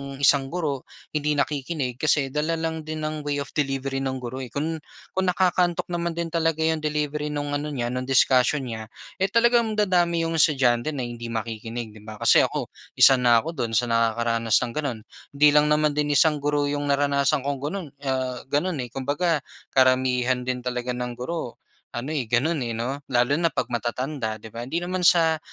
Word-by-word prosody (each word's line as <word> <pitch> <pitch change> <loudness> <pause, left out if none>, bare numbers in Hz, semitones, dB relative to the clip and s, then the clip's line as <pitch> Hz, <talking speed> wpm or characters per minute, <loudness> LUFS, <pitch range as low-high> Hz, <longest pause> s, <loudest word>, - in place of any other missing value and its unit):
isang 140 0 +3
guro 145 -4 -3 0.2
hindi 150 0 0
nakikinig 140 -3 -2
kasi 145 -3 +2
dala 150 +3 0
lang 160 -1 -4
din 155 0 -4
ng 155 0 -3
way 145 -1 -2
of - - -12
delivery 135 -2 -1
ng 135 -1 -2
guro, 130 0 -6
eh. 130 - -5
Kun 155 +6 -3 0.3
kung 190 0 -1
nakakaantok 180 -1 +1
naman 170 -1 -2
din 170 -1 -3
talaga 165 -1 +1
'yong 160 0 +1
delivery 150 -1 -2
no'ng 145 -1 -3
ano 145 +1 -2
niya 120 -5 -3
no'ng 130 0 -3
discussion 135 +1 +3
niya, 110 -3 -6 0.3
eh, 190 - +2
talagang 230 +1 +3
dadami 175 -5 +2
'yong 165 0 -1
estudyante 130 -1 +3
na 130 - -3
hindi 120 -1 -6
makikinig, 115 0 -5
'di 105 - -14
ba? 110 - -7
Kasi - - +5
ako - - -5 0.2
isa 135 -1 +7
na 120 -2 +4
ako 165 - -4
do'n 120 -8 -3
sa 120 0 +1
nakakaranas 115 0 +1
ng 120 - +2
gano'n. 135 -4 -3 0.4
Hindi 150 +1 +6
lang 150 0 +4
naman 150 0 +3
din 145 0 0
isang 150 0 +4
guro 145 0 0
'yong 145 0 -1
naranasan 140 -1 +2
kong 140 -1 -2
gano'n, 155 +5 -4 0.2
ah, 130 -1 -1
gano'n 150 +3 0
eh. 125 - -3
Kumbaga 145 +6 -1 0.3
karamihan 130 -1 +2
din 125 -1 -2
talaga 125 0 -3
ng 125 0 -3
guro 125 +2 -5 0.4
ano, 125 +5 -4
eh, 140 -7 -2
gano'n 140 +8 +1
eh, 120 -3 -3
'no? 125 +5 -3
Lalo 130 +3 +2
na 170 - +3
pag - - -2
matatanda 120 0 -2
'di 110 0 -12
ba 120 +2 -6
hindi 165 +6 -2
naman 185 +1 -2
sa 160 -2 +4
140 Hz, 195 wpm, -24 LUFS, 125-155 Hz, 0.4 s, isa